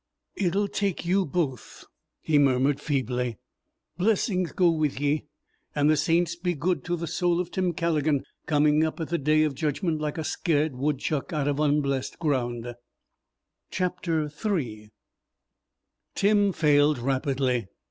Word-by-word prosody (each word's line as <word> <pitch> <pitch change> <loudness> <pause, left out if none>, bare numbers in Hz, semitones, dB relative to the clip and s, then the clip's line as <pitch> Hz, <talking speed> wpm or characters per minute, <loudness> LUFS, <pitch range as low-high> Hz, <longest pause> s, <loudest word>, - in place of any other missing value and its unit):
"It'll 200 +2 +1
take 200 -4 -2
you 185 +1 +2
both," 140 -6 -3 0.4
he 150 -2 +2
murmured 135 0 +3
feebly. 125 -5 -1 0.6
"Blessings 185 -3 +1
go 180 -2 +3
with 155 -4 -1
ye, 145 +1 0 0.5
and 145 +1 +3
the - - +4
saints 170 +3 +1
be 175 0 -2
good 160 0 -1
to 175 - 0
the 170 0 -4
soul 175 +1 0
of 180 -1 -3
Tim 185 -2 0
Calligan, 155 -4 0 0.2
coming 150 0 +3
up 160 +1 -2
at 160 - -4
the 170 - 0
Day 155 +2 +3
of 155 -2 0
Judgment 155 +3 -1
like 150 +1 -3
a 160 - -2
scared 155 -3 0
woodchuck 140 +3 -1
out 145 -2 0
of 145 0 0
unblessed 145 -3 0
ground!" 120 -6 -1 1.1
III 155 - -2 1.3
Tim 205 0 +3
failed 150 -3 +3
rapidly. 130 -2 0
150 Hz, 135 wpm, -26 LUFS, 140-175 Hz, 1.3 s, the